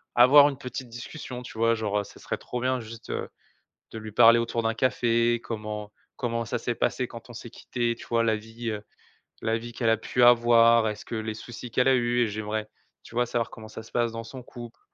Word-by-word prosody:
avoir 140 +4 +8
une 140 - -6
petite 130 -1 -6
discussion, 125 +2 -7
tu 125 - -10
vois? 115 +1 +3
Genre, 105 -2 -1
heu, - - -2
ça - - -14
serait - - -4
trop 125 -1 -5
bien 130 0 +1
juste, 115 0 -10
heu, - - -3 0.6
de 110 - -7
lui 110 -1 -8
parler 115 +1 +7
autour 115 0 -1
d'un 115 0 0
café. 120 -2 +2
Comment 105 -2 -5 0.2
comment 115 -2 -2
ça 110 - -2
s'est - - -2
passé - - 0
quand - - -11
on - - -8
s'est - - -8
quitté, 120 -1 -2
tu - - -12
vois? 115 0 +2
La 110 -1 +2
vie, 115 +2 -6
heu, 105 -1 -4 0.6
la 115 +1 +1
vie 120 +1 -8
qu'elle 115 -2 0
a 115 - +4
pu 120 +3 0
avoir. 115 -1 +6
Est-ce 105 -1 -4
que - - -6
les 110 0 -3
soucis 120 +2 -9
qu'elle 125 +3 +3
a 130 - +5
eus? 120 0 +1
Et - - 0
j'aimerais, 110 +1 -3 0.3
tu - - -13
vois, 120 0 +2
savoir 120 -1 -1
comment 110 -1 -11
ça 110 +1 -9
se 110 - -16
passe 120 -1 +1
dans 115 0 -5
son 130 +3 -9
couple, 120 -1 -11
115 Hz, 235 wpm, -27 LUFS, 110-120 Hz, 0.6 s, avoir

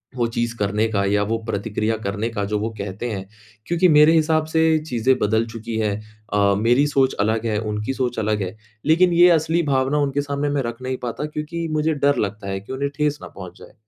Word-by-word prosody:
वो 120 -2 +1
चीज़ 115 0 -2
करने 105 +2 +1
का 100 -2 +1
या 100 +1 +2
वो 110 +2 -1
प्रतिक्रिया 110 +1 -1
करने 105 +1 -3
का 110 -3 -3
जो 105 +1 -1
वो 110 +2 -2
कहते 100 +4 -4
हैं, 95 -2 -5 0.4
क्योंकि 175 +2 +3
मेरे 150 +1 +6
हिसाब 155 -1 +2
से 160 0 +1 0.3
चीज़ें 125 +2 +2
बदल 110 +2 +1
चुकी 115 0 -5
है। 105 -2 0 0.4
अ, 100 -1 +3
मेरी 120 +6 +3
सोच 135 -2 +2
अलग 110 +2 +1
है, 110 -2 0
उनकी 105 +3 -3
सोच 125 -3 -2
अलग 105 -1 0
है, 95 +3 -5 0.3
लेकिन 170 +4 +4
ये 175 +1 +7
असली 165 +2 0
भावना 135 +2 +1
उनके 145 -1 0
सामने 145 0 -2
मैं 145 -1 0
रख 120 +1 -5
नहीं 130 0 -3
पाता 120 +4 -3
क्योंकि 155 +2 -4
मुझे 155 +1 +1
डर 145 -1 +2
लगता 100 0 -10
है 95 0 -2
की 100 +7 -9
उन्हें 140 +1 -2
ठेस 150 -1 0
ना - - -8
पहुँच 90 -2 -11
जाए। - - -14
120 Hz, 220 wpm, -22 LUFS, 105-145 Hz, 0.4 s, ये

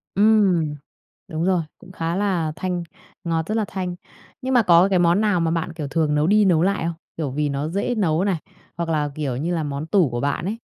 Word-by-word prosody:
Ừm. 195 -7 +3 0.5
Đúng 160 +1 -2
rồi, 180 -3 +2 0.2
cũng 185 - -14
khá 165 -2 -2
là 185 -5 0
thanh, 180 -2 -2 0.4
ngọt 165 -1 -1
rất 215 - -1
là 220 - +1
thanh. 180 -2 -4 0.5
Nhưng 260 0 -1
mà 245 - +6
có 175 0 +6
cái 185 -2 +3
món 175 +3 +3
nào 205 -4 +2
mà 165 -1 +1
bạn, 165 0 -2
kiểu, 150 -4 -5
thường 155 0 0
nấu 150 +1 +2
đi 210 +2 +4
nấu 170 -4 +4
lại 200 0 +1
không? 170 - -1 0.2
Kiểu, 145 -5 -2
vì 150 +1 -1
nó 140 +2 -2
dễ 200 +8 -1
nấu 180 -5 +1
này, 195 -4 +1 0.4
hoặc 170 -1 -2
là, 150 -2 0
kiểu 140 -5 -2
như 170 +5 -1
là, 160 - -1
món 145 +1 -4
tủ 180 -5 +3
của 120 0 -3
bạn 145 +3 -1
ấy? 210 +4 -2
170 Hz, 235 wpm, -22 LUFS, 155-190 Hz, 0.5 s, mà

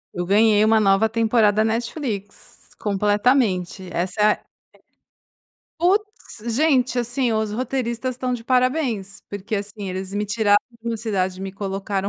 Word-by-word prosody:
Eu 175 0 -3
ganhei 210 +1 +4
uma 220 0 +4
nova 200 +1 +3
temporada 220 -2 +3
Netflix, 225 -2 -4
completamente. 205 -3 +1
Essa 185 +4 -2
é 210 0 +5
g - - -23 1.4
putz! 365 - -1
Gente, 265 -5 +2
assim, 245 0 0
os 220 -1 -1
roteiristas 250 +1 -2
estão 255 0 -2
de 240 -2 -4
parabéns, 250 -5 0
porque, 205 +2 -5
assim, 200 -1 -5
eles 190 +1 -5
me 210 +1 0
tiraram 205 0 +3 0.2
de 235 - -5
uma 230 - -1
cidade 190 -4 -2
e 190 - -7
me 195 - -5
colocaram 195 0 -3
215 Hz, 145 wpm, -22 LUFS, 200-245 Hz, 1.4 s, é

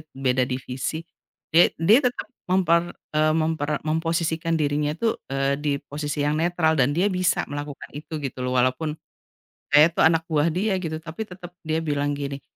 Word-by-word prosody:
beda 130 -1 +1
divisi, 130 +5 -4 0.5
dia 170 +2 +6
dia 200 - +5
tetap 250 - -5 0.2
memper 170 -2 +3 0.3
eee, 155 0 +4
memper 160 -2 0 0.2
memposisikan 165 +1 0
dirinya 145 0 0
tuh, 225 +6 -1
eee, 135 0 +1
di 145 0 -1
posisi 145 0 -4
yang 150 +1 +1
netral 170 -1 +2
dan 130 +2 +3
dia 180 +4 +3
bisa 185 0 +1
melakukan 145 0 -6
itu, 150 +2 -8
gitu 130 -1 -5
loh, 125 0 -1
walaupun 130 +5 0 0.7
saya 145 +1 +7
itu - - -6
anak 165 0 +4
buah 155 -1 +1
dia, 195 +5 0
gitu, 160 -1 -3
tapi 165 +6 -7
tetap 180 -1 -10
dia 160 0 -1
bilang 145 0 0
gini, 140 -1 -5
155 Hz, 165 wpm, -24 LUFS, 145-165 Hz, 0.7 s, saya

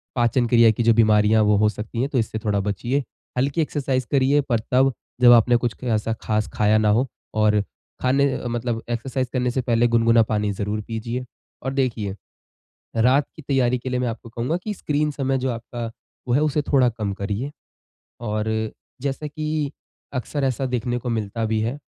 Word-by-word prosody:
पाचन 120 0 +2
क्रिया 115 -1 +6
की 115 +2 -1
जो 115 0 +5
बीमारियाँ 110 -1 +4
वो 105 0 +4
हो 105 +1 +4
सकती 110 +3 -4
है, 135 - +1
तो 140 - -2
इससे 110 -1 -2
थोड़ा 105 -2 0
बचिए। 105 +8 -1 0.3
हल्की 140 +6 +1
एक्सरसाइज़ 135 -4 -1
करिए 140 +1 +3
पर 115 -3 +2
तब 130 +1 +4 0.3
जब 120 -1 +8
आपने 120 +1 +5
कुछ 120 -1 -2
ऐसा 115 -2 0
ख़ास 110 -1 0
खाया 105 0 +3
ना 110 -1 +3
हो 115 +5 +3 0.3
और 105 -1 +3 0.4
खाने 135 +2 +3
अ, - - -4
मतलब 120 -1 -2
एक्सरसाइज़ 130 +2 -2
करने 125 -1 +1
से 130 - 0
पहले 120 -1 +2
गुनगुना 115 0 +4
पानी 105 -1 0
ज़रूर 105 +2 -2
पीजिए। 115 +2 -4 0.4
और 130 +1 -2
देखिए, 115 -7 -1 0.8
रात 130 +5 +4
की 155 - -10
तैयारी 125 -3 +2
के 125 - -6
लिए 125 0 0
मैं 125 - 0
आपको 115 0 -6
कहूँगा 120 +8 -2
कि 215 - -2
स्क्रीन 150 -4 0
समय 135 -2 -1
जो 130 0 -1
आपका 120 0 -5 0.4
वो 120 - +2
है 145 - +3
उसे 150 -1 +1
थोड़ा 135 -3 +3
कम 105 -3 -3
करिए। 100 +7 -3 0.7
और 110 0 -1 0.3
जैसा 140 +2 -2
कि 155 -1 -2 0.4
अक्सर 140 +3 -2
ऐसा 135 0 0
देखने 125 -1 -1
को 125 - -6
मिलता 110 0 -2
भी 110 0 0
है 115 +5 -1
120 Hz, 190 wpm, -23 LUFS, 110-135 Hz, 0.8 s, जब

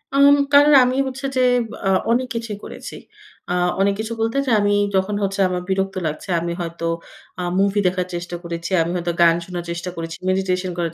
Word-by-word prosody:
আম 280 +1 +7 0.2
কারণ 290 +1 +7
আমি 255 +1 0
হচ্ছে 270 +1 -6
যে - - +3 0.5
আ - - +3 0.2
অনেক 255 +2 +1
কিছুই 230 -3 -4
করেছি। - - -8 0.6
আ - - +1 0.3
অনেক 200 0 +3
কিছু 220 +1 -3
বলতে 225 +4 0
যা - - +1
আমি 205 0 +2 0.2
যখন 190 +2 +1
হচ্ছে 195 0 -2
আমার 180 -1 -2
বিরক্ত 195 0 -1
লাগছে 155 +5 -6
আমি 170 0 -2
হয়তো 170 0 -4 0.5
আ - - -2 0.2
মুভি 200 +1 +2
দেখার 180 0 -1
চেষ্টা 175 0 -5
করেছি, 170 +1 -5
আমি 165 - -1
হয়তো 175 0 -1
গান 165 -1 +6
শোনার 180 -2 -5
চেষ্টা 175 +1 -4
করেছি, 165 0 -6
মেডিটেশন 185 -1 0
করার 170 -2 -2
190 Hz, 190 wpm, -21 LUFS, 175-220 Hz, 0.6 s, আম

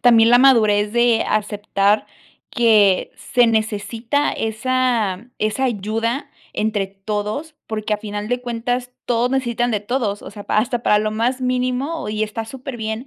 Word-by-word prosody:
también 230 -2 +6
la 245 - +7
madurez 215 -6 +4
de 235 -1 +3
aceptar 205 -1 +1 0.4
que 215 -6 +4
se 245 -2 +2
necesita 225 +5 0
esa 230 -2 -1
esa 215 +5 0
ayuda 230 +4 -2 0.2
entre 210 -2 -1
todos, 210 +10 -4
porque, 215 -1 -3
a 210 - +1
final 210 0 -5
de 245 0 -1
cuentas, 245 +1 -3
todos 240 0 +1
necesitan 245 -2 0
de 210 -3 0
todos, 210 -2 -2
o - - -9
sea, 205 -1 -10
pa - - -1
hasta 235 +2 0
para 210 - +4
lo 215 0 -1
más 235 +4 -1
mínimo 255 +5 -1
y 215 0 -2
está 215 +1 -3
su 220 - -12
superbién. 240 -2 -5
225 Hz, 155 wpm, -20 LUFS, 210-245 Hz, 0.4 s, la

